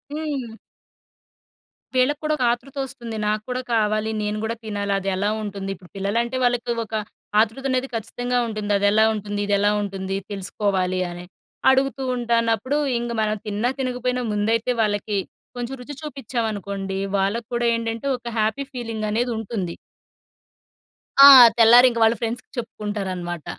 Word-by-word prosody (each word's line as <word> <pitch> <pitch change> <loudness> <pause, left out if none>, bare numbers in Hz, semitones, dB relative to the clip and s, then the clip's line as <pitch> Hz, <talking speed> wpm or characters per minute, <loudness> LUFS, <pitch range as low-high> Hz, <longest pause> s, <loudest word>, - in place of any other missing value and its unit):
హ్మ్. 275 -7 -4 1.4
వీళ్ళకి 265 +3 +2
కూడా 305 0 +1
ఒక 255 - -1
ఆతృతొస్తుంది. 255 -2 -5
నాకు 210 0 0
కూడా 250 0 -2
కావాలి. 215 0 +1
నేను 210 0 -2
గూడా 225 +1 -2
తినాలి 205 -2 -2
అదెలా 195 +1 -1
ఉంటుంది. 200 -2 -5
ఇప్పుడు 180 -1 -18
పిల్లలంటే 230 +6 -1
వాళ్ళకి 245 -1 +1
ఒక 220 - -6 0.5
ఆతృతనేది 255 +4 -1
ఖచ్చితంగా 245 +2 -2
ఉంటుంది. 215 -2 -3
అదెలా 205 +2 +4
ఉంటుంది. 205 -1 -4
ఇదెలా 205 0 +3
ఉంటుంది 195 -1 -3
తెలుసుకోవాలి 190 -2 -1
అని. 175 0 -8 0.5
అడుగుతూ 270 0 +1
ఉంటానప్పుడు 235 +2 +1 0.2
ఇంగ 235 0 -3
మనం 215 0 0
తిన్నా, 210 +4 0
తినకపోయినా 250 -1 -1
ముందైతే 225 +3 +1
వాళ్ళకి 205 -1 0 0.4
కొంచెం 245 +2 -4
రుచి 290 +4 -8
చూపిచ్చామనుకోండి, 215 -9 -4 0.2
వాళ్ళకి 205 +4 -1
కూడా 240 0 0
ఏంటంటే 230 +2 -3
ఒక 240 - -12
హ్యాపీ 215 +5 0
ఫీలింగనేది 230 0 -2
ఉంటుంది. 200 -5 -4 1.5
ఆ! - - +12 0.3
తెల్లారింక 235 +1 +7
వాళ్ళ 225 +1 +5
ఫ్రెండ్స్‌కి 230 +1 -3
చెప్పుకుంటారనమాట. 195 -7 -4
225 Hz, 125 wpm, -23 LUFS, 205-245 Hz, 1.5 s, ఆ